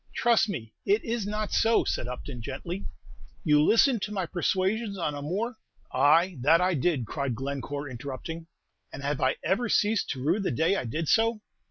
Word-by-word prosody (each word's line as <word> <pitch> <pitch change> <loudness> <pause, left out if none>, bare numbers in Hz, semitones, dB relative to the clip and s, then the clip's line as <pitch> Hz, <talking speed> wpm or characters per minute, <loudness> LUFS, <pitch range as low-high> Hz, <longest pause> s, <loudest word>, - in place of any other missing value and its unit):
"Trust 235 -2 +3
me 115 - -5
it 405 +2 +2
is 230 -3 -2
not 210 0 -3
so," 225 0 +4
said 120 - -2
Upton, 125 0 -6
gently; 170 - -5 0.6
"you 150 -4 +4
listened 230 - +4
to 210 - -3
my 195 -3 -1
persuasions 195 +5 -1
on 165 -4 -1
a 145 - -5
more 210 +10 -2 0.2
" - - -29
"Ay, 155 +6 +4
that 160 +6 +5
I 180 +1 +2
did!" 145 -4 0
cried 135 +2 -3
Glencore, 140 +2 -4
interrupting; 140 +6 -7 0.4
"and 140 - -8
have 145 0 -1
I 130 0 +2
ever 225 +5 0
ceased 210 0 +2
to 130 -2 -4
rue 165 +8 +2
the 195 - -1
day 160 +9 +2
I 160 - -2
did 155 +8 -3
so? 225 +2 +3
165 Hz, 190 wpm, -27 LUFS, 140-210 Hz, 0.6 s, that